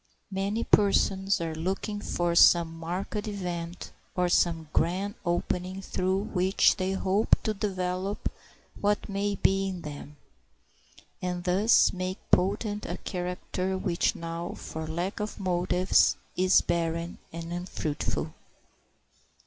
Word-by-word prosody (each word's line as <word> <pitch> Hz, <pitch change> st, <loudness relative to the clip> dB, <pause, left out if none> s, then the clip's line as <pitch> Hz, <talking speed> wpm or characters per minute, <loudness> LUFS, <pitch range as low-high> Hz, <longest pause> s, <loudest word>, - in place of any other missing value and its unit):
Many 200 Hz, +4 st, -1 dB
persons 195 Hz, -1 st, +3 dB
are 165 Hz, -1 st, -2 dB
looking 190 Hz, +5 st, -3 dB
for 175 Hz, -3 st, 0 dB
some 170 Hz, -1 st, +6 dB
marked 185 Hz, +6 st, -3 dB
event 180 Hz, -4 st, -5 dB, 0.2 s
or 180 Hz, -1 st, +2 dB
some 165 Hz, -2 st, +2 dB
grand 185 Hz, +5 st, +1 dB
opening 180 Hz, +2 st, -1 dB
through 190 Hz, +2 st, 0 dB
which 190 Hz, -1 st, +3 dB
they 190 Hz, 0 st, -1 dB
hope 195 Hz, +2 st, +3 dB
to 215 Hz, -, 0 dB
develop 190 Hz, -1 st, -2 dB, 0.5 s
what 205 Hz, 0 st, +1 dB
may 200 Hz, 0 st, -1 dB
be 195 Hz, 0 st, +2 dB
in 185 Hz, -2 st, -4 dB
them, 145 Hz, 0 st, -8 dB, 1.0 s
and 180 Hz, -1 st, -2 dB
thus 190 Hz, +5 st, +4 dB
make 185 Hz, +1 st, -3 dB
potent 205 Hz, +3 st, +1 dB
a -, -, -3 dB
character 180 Hz, 0 st, -3 dB
which 180 Hz, -2 st, 0 dB
now, 165 Hz, +1 st, -5 dB
for 160 Hz, 0 st, -6 dB
lack 175 Hz, +5 st, -3 dB
of 210 Hz, 0 st, -4 dB
motives, 180 Hz, 0 st, +3 dB, 0.2 s
is 185 Hz, +1 st, +5 dB
barren 170 Hz, 0 st, -2 dB
and 165 Hz, +1 st, -6 dB
unfruitful. 175 Hz, -4 st, -3 dB
185 Hz, 120 wpm, -28 LUFS, 175-195 Hz, 1.0 s, some